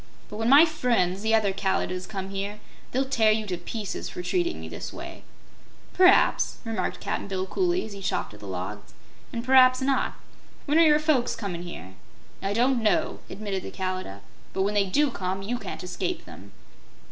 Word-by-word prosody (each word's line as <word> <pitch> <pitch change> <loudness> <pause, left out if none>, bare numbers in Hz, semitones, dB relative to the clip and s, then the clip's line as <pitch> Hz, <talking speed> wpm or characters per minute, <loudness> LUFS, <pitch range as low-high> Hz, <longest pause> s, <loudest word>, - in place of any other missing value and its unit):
But 210 - -7
when 225 +1 0
my 285 +5 +9
friends, 235 - 0
the 220 +1 +3
other 205 -3 +2
Kalidahs, 185 -1 -1
come 195 -1 -5
here, 200 +2 -4 0.3
they'll 265 +2 +1
tear 230 -5 +3
you 215 0 0
to 185 -3 -2
pieces 195 +4 -5
for 180 - -6
treating 350 - 0
me - - -7
this - - -7
way." - - -9 0.7
"P'raps," 370 +1 +5
remarked 220 -5 -2
Cap'n - - -3
Bill, 190 -1 -2
coolly, 360 - 0
as 220 - -8
he 200 - -9
chopped 185 - -2
at 105 - -13
the 100 - -10
logs, 95 -6 -6 0.4
"an' 230 - -4
p'raps 255 0 +6
not. 270 0 0 0.5
When 300 +2 +3
are 330 - +7
your 300 -1 +6
folks 300 -5 +1
comin' 185 -6 -4
here?" 170 - -8 0.5
"I 195 - -1
don't 245 +2 +2
know," 215 -2 +1
admitted 195 -1 -4
the - - -7
Kalidah. 185 - -4 0.3
"But 190 - +1
when 205 +2 0
they 200 -1 +2
DO 285 +8 +2
come, 190 -2 -3
you 240 +4 -2
can't - - -7
escape 180 - -3
them." - - -12
210 Hz, 190 wpm, -26 LUFS, 185-260 Hz, 0.7 s, my